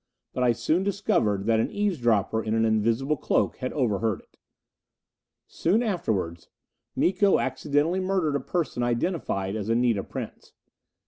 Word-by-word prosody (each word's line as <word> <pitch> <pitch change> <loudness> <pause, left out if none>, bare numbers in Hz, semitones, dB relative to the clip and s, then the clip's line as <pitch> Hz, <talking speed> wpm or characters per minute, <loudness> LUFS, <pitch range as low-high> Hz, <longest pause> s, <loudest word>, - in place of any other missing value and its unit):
But 125 - -3
I 120 -1 +4
soon 160 +9 0
discovered 180 - 0
that 115 0 +3
an - - 0
eavesdropper 120 - +1
in 110 0 -1
an 115 0 +2
invisible 115 +7 +1
cloak - - 0
had 130 - -3
overheard 110 -6 0
it! - - -32 1.1
Soon 205 +8 +1
afterwards 100 - -2 0.5
Miko 190 +2 +3
accidentally 145 +6 0
murdered 185 -6 0
a - - +1
person 155 -3 -2
identified 120 - -1
as 110 0 -4
Anita 115 -3 +2
Prince. - - -8
125 Hz, 135 wpm, -26 LUFS, 110-175 Hz, 1.1 s, I